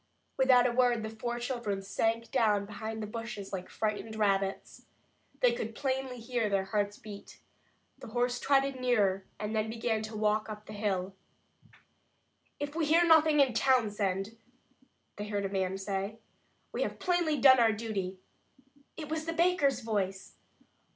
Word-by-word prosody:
Without 255 Hz, -2 st, +5 dB
a 250 Hz, -, +3 dB
word, 240 Hz, -2 st, +2 dB
the 220 Hz, -, -4 dB
four 240 Hz, +2 st, -4 dB
children 240 Hz, -5 st, -2 dB
sank 225 Hz, +3 st, -1 dB
down 210 Hz, -3 st, +2 dB
behind 220 Hz, +2 st, -5 dB
the -, -, -2 dB
bushes 215 Hz, -2 st, -6 dB
like 185 Hz, -1 st, -5 dB
frightened 220 Hz, 0 st, -3 dB
rabbits. 195 Hz, -2 st, -1 dB, 0.5 s
They 245 Hz, -, +5 dB
could 225 Hz, -1 st, -4 dB
plainly 265 Hz, -1 st, -2 dB
hear 230 Hz, -2 st, -1 dB
their 195 Hz, -1 st, +1 dB
hearts 205 Hz, +1 st, -1 dB
beat. 205 Hz, -2 st, -11 dB, 0.6 s
The 265 Hz, -, -9 dB
horse 245 Hz, +2 st, 0 dB
trotted 275 Hz, -1 st, +2 dB
nearer, 205 Hz, -7 st, +1 dB
and 210 Hz, +1 st, -3 dB
then 215 Hz, 0 st, 0 dB
began 225 Hz, -1 st, -1 dB
to 215 Hz, 0 st, -6 dB
walk 215 Hz, 0 st, +1 dB
up 210 Hz, 0 st, -8 dB
the 215 Hz, -, -9 dB
hill. 195 Hz, -3 st, -2 dB, 1.5 s
"If 290 Hz, 0 st, -4 dB
we 325 Hz, -2 st, 0 dB
hear 335 Hz, +3 st, +5 dB
nothing 315 Hz, -2 st, +6 dB
in 265 Hz, -3 st, +3 dB
Townsend," 210 Hz, -5 st, +1 dB, 0.8 s
they 205 Hz, +1 st, -5 dB
heard 205 Hz, -1 st, -2 dB
a -, -, -2 dB
man 190 Hz, -1 st, -1 dB
say, 195 Hz, +2 st, -3 dB, 0.5 s
"we -, -, -3 dB
have -, -, -2 dB
plainly 345 Hz, -5 st, +1 dB
done 260 Hz, -1 st, +7 dB
our 230 Hz, -2 st, +5 dB
duty." 205 Hz, -4 st, -3 dB, 0.8 s
It 310 Hz, -2 st, -6 dB
was 315 Hz, +1 st, -3 dB
the 330 Hz, -, -2 dB
baker's 330 Hz, -7 st, +2 dB
voice! 195 Hz, -4 st, -2 dB
220 Hz, 155 wpm, -31 LUFS, 205-255 Hz, 1.5 s, done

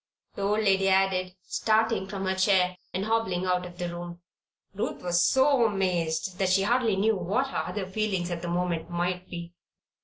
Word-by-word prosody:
the -, -, -7 dB
old 210 Hz, +2 st, +1 dB
lady 195 Hz, -1 st, +3 dB
added, 190 Hz, -1 st, +2 dB
starting 220 Hz, -2 st, +1 dB
from 195 Hz, 0 st, -4 dB
her 190 Hz, -, +1 dB
chair 190 Hz, -1 st, +3 dB, 0.2 s
and 190 Hz, +2 st, -2 dB
hobbling 215 Hz, -5 st, 0 dB
out 180 Hz, -1 st, 0 dB
of 175 Hz, 0 st, -13 dB
the 175 Hz, -, -3 dB
room. 175 Hz, 0 st, -7 dB, 0.5 s
Ruth 200 Hz, -2 st, -4 dB
was 175 Hz, 0 st, +2 dB
so 265 Hz, -1 st, +4 dB
amazed 180 Hz, -3 st, -1 dB
that 190 Hz, -1 st, +2 dB
she 195 Hz, +1 st, +3 dB
hardly 230 Hz, -1 st, +2 dB
knew 215 Hz, +3 st, +2 dB
what 200 Hz, +9 st, -1 dB
her -, -, -2 dB
other 190 Hz, +2 st, -3 dB
feelings 190 Hz, -2 st, -2 dB
at 170 Hz, -1 st, -3 dB
the 175 Hz, -, -5 dB
moment 175 Hz, -1 st, -1 dB
might 180 Hz, +1 st, -2 dB
be. 170 Hz, 0 st, -7 dB
190 Hz, 185 wpm, -27 LUFS, 180-205 Hz, 0.5 s, so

